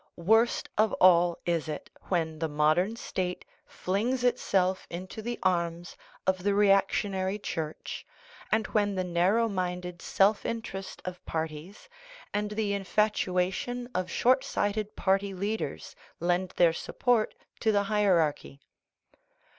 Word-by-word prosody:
Worst 225 Hz, +7 st, +3 dB
of 215 Hz, 0 st, +4 dB
all 175 Hz, -1 st, +5 dB
is 170 Hz, -2 st, 0 dB
it 150 Hz, -1 st, -6 dB, 0.2 s
when 160 Hz, -4 st, -1 dB
the 160 Hz, -, 0 dB
modern 155 Hz, +8 st, +2 dB
state 180 Hz, -5 st, -3 dB, 0.2 s
flings 235 Hz, +7 st, -1 dB
itself 190 Hz, -6 st, +1 dB
into 185 Hz, +5 st, -6 dB
the 240 Hz, +2 st, -4 dB
arms 170 Hz, -1 st, 0 dB, 0.3 s
of 190 Hz, -1 st, +1 dB
the 200 Hz, +1 st, +1 dB
reactionary 195 Hz, -1 st, +2 dB
Church, 160 Hz, -6 st, -5 dB, 0.5 s
and 220 Hz, 0 st, +2 dB
when 205 Hz, -2 st, 0 dB
the 185 Hz, -, 0 dB
narrow 180 Hz, +6 st, +2 dB
minded 180 Hz, -3 st, -3 dB
self 200 Hz, +2 st, +2 dB
interest 210 Hz, -4 st, -5 dB
of 180 Hz, 0 st, -6 dB
parties 160 Hz, +4 st, -5 dB, 0.5 s
and 210 Hz, 0 st, -1 dB
the 210 Hz, -1 st, -1 dB
infatuation 200 Hz, +3 st, 0 dB
of 185 Hz, 0 st, -1 dB
short 255 Hz, +8 st, +3 dB
sighted 205 Hz, +1 st, -2 dB
party 195 Hz, 0 st, +1 dB
leaders 205 Hz, +4 st, -3 dB, 0.2 s
lend 180 Hz, +2 st, +1 dB
their 170 Hz, -2 st, +5 dB
support 235 Hz, +5 st, 0 dB, 0.2 s
to 220 Hz, -, +2 dB
the 205 Hz, -1 st, +2 dB
hierarchy. 185 Hz, -9 st, +1 dB
190 Hz, 125 wpm, -29 LUFS, 175-210 Hz, 0.5 s, all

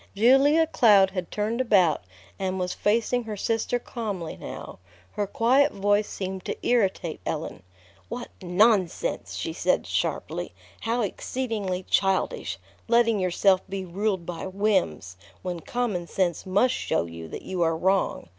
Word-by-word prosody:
Julia 270 Hz, +9 st, +5 dB
Cloud 205 Hz, -10 st, +5 dB
had 185 Hz, -2 st, -4 dB
turned 220 Hz, +4 st, -1 dB
about, 190 Hz, -10 st, +3 dB, 0.4 s
and 190 Hz, -1 st, -1 dB
was 180 Hz, 0 st, -1 dB
facing 230 Hz, +3 st, +1 dB
her 215 Hz, -2 st, -5 dB
sister 225 Hz, +3 st, 0 dB
calmly 205 Hz, -8 st, -5 dB
now. -, -, -8 dB, 0.3 s
Her 205 Hz, -, -2 dB
quiet 260 Hz, +8 st, +3 dB
voice 205 Hz, +1 st, +1 dB
seemed 190 Hz, -1 st, -5 dB
to -, -, -3 dB
irritate 195 Hz, -8 st, +1 dB
Ellen. -, -, -4 dB, 0.5 s
"What 240 Hz, +1 st, -5 dB
nonsense!" 190 Hz, -, +1 dB
she -, -, -3 dB
said -, -, +1 dB
sharply. -, -, -2 dB, 0.2 s
"How 235 Hz, +2 st, -1 dB
exceedingly 205 Hz, -4 st, -3 dB
childish, 195 Hz, -1 st, +1 dB, 0.3 s
letting 230 Hz, -2 st, +3 dB
yourself 185 Hz, +1 st, +3 dB
be 195 Hz, -1 st, -4 dB
ruled 190 Hz, 0 st, -1 dB
by 175 Hz, -1 st, -5 dB
whims, 185 Hz, -, 0 dB, 0.3 s
when 180 Hz, -2 st, -3 dB
common 205 Hz, -4 st, -2 dB
sense 180 Hz, -2 st, -1 dB
must 205 Hz, +7 st, +3 dB
show -, -, -1 dB
you 85 Hz, -1 st, -8 dB
that -, -, -8 dB
you 185 Hz, -2 st, -3 dB
are 165 Hz, -1 st, +2 dB
wrong. 190 Hz, -, 0 dB
195 Hz, 140 wpm, -26 LUFS, 180-230 Hz, 0.5 s, Julia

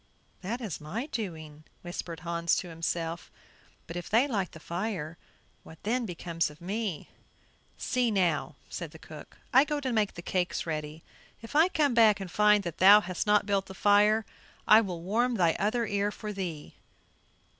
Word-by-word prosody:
"That 225 Hz, +7 st, -4 dB
is 205 Hz, -11 st, -5 dB
my 195 Hz, -, -4 dB
doing," 160 Hz, -, -6 dB, 0.2 s
whispered 175 Hz, -1 st, -6 dB
Hans 170 Hz, -1 st, 0 dB
to 180 Hz, -, -3 dB
himself; 165 Hz, 0 st, -3 dB, 0.6 s
"but 165 Hz, -, -8 dB
if 175 Hz, -1 st, -5 dB
they 235 Hz, +6 st, +4 dB
light 200 Hz, -9 st, -2 dB
the 160 Hz, -, -10 dB
fire, 170 Hz, -2 st, -4 dB, 0.5 s
what 160 Hz, -, -14 dB
then 235 Hz, +2 st, 0 dB
becomes 170 Hz, -2 st, -2 dB
of 150 Hz, +1 st, -15 dB
me?" 195 Hz, -2 st, -4 dB, 0.7 s
"See 250 Hz, -2 st, 0 dB
now," 160 Hz, -9 st, 0 dB
said 170 Hz, -3 st, -6 dB
the 160 Hz, -, -13 dB
cook; 155 Hz, -1 st, -12 dB, 0.2 s
"I 265 Hz, +2 st, +8 dB
go 295 Hz, 0 st, -2 dB
to 260 Hz, -3 st, -2 dB
make 215 Hz, -3 st, +1 dB
the 175 Hz, -, -8 dB
cakes 180 Hz, 0 st, -1 dB
ready; 155 Hz, -1 st, -5 dB, 0.4 s
if 230 Hz, -, -10 dB
I 320 Hz, +3 st, +6 dB
come 295 Hz, -7 st, +1 dB
back 220 Hz, -3 st, +5 dB
and 190 Hz, -2 st, -7 dB
find 210 Hz, -1 st, +4 dB
that 170 Hz, -4 st, -6 dB
thou 200 Hz, +3 st, +8 dB
hast 185 Hz, +2 st, -4 dB
not 210 Hz, 0 st, +4 dB
built 200 Hz, -1 st, 0 dB
the 190 Hz, -, -10 dB
fire, 210 Hz, +2 st, +4 dB, 0.4 s
I 215 Hz, +1 st, +8 dB
will 180 Hz, -6 st, -5 dB
warm 235 Hz, +6 st, +1 dB
thy 170 Hz, -5 st, +2 dB
other 230 Hz, +4 st, +1 dB
ear 205 Hz, -1 st, 0 dB
for 210 Hz, 0 st, -6 dB
thee." 175 Hz, -6 st, -6 dB
190 Hz, 175 wpm, -29 LUFS, 170-220 Hz, 0.7 s, I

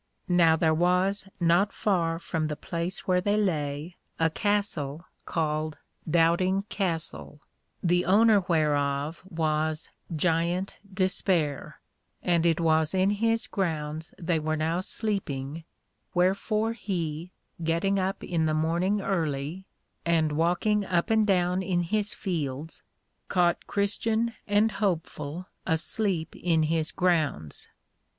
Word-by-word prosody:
Now 170 Hz, -3 st, +5 dB
there 160 Hz, 0 st, +2 dB
was 180 Hz, +4 st, +2 dB
not 175 Hz, +4 st, +3 dB
far 170 Hz, -5 st, 0 dB
from 165 Hz, -2 st, -2 dB
the 150 Hz, -, -3 dB
place 170 Hz, +4 st, -4 dB
where 180 Hz, -1 st, +2 dB
they 205 Hz, +2 st, +1 dB
lay, 155 Hz, -4 st, -1 dB, 0.2 s
a 165 Hz, 0 st, +3 dB
Castle 175 Hz, -6 st, -1 dB, 0.2 s
called 155 Hz, -1 st, -1 dB, 0.3 s
Doubting 175 Hz, +4 st, +3 dB
Castle, 165 Hz, -5 st, -3 dB, 0.4 s
the 180 Hz, 0 st, +2 dB
owner 210 Hz, +3 st, +5 dB
whereof 145 Hz, -2 st, +1 dB
was 155 Hz, -2 st, -1 dB, 0.2 s
Giant 170 Hz, +3 st, 0 dB
Despair, 185 Hz, -6 st, 0 dB, 0.4 s
and 170 Hz, -1 st, +3 dB
it 165 Hz, -1 st, +2 dB
was 160 Hz, 0 st, +2 dB
in 190 Hz, +2 st, +3 dB
his 225 Hz, +2 st, +1 dB
grounds 160 Hz, -4 st, -3 dB
they 165 Hz, -2 st, 0 dB
were 155 Hz, +1 st, -1 dB
now 160 Hz, +3 st, 0 dB
sleeping: 165 Hz, -8 st, -3 dB, 0.5 s
wherefore 210 Hz, +5 st, +1 dB
he, 175 Hz, -6 st, -3 dB, 0.3 s
getting 170 Hz, +5 st, +1 dB
up 190 Hz, +1 st, -2 dB
in 165 Hz, -3 st, 0 dB
the 155 Hz, 0 st, +1 dB
morning 170 Hz, +6 st, +1 dB
early, 160 Hz, 0 st, -2 dB, 0.4 s
and 165 Hz, -2 st, +2 dB
walking 175 Hz, +7 st, +2 dB
up 185 Hz, +2 st, 0 dB
and 220 Hz, -1 st, +4 dB
down 180 Hz, -1 st, +2 dB
in 180 Hz, -1 st, 0 dB
his 210 Hz, +4 st, -1 dB
fields, 155 Hz, -4 st, -3 dB, 0.5 s
caught 175 Hz, -2 st, +1 dB
Christian 220 Hz, +3 st, 0 dB
and 210 Hz, +2 st, +3 dB
Hopeful 170 Hz, -4 st, -2 dB, 0.2 s
asleep 165 Hz, +1 st, 0 dB
in 165 Hz, -2 st, +1 dB
his 160 Hz, 0 st, 0 dB
grounds. 155 Hz, -, 0 dB
170 Hz, 120 wpm, -27 LUFS, 155-195 Hz, 0.5 s, Now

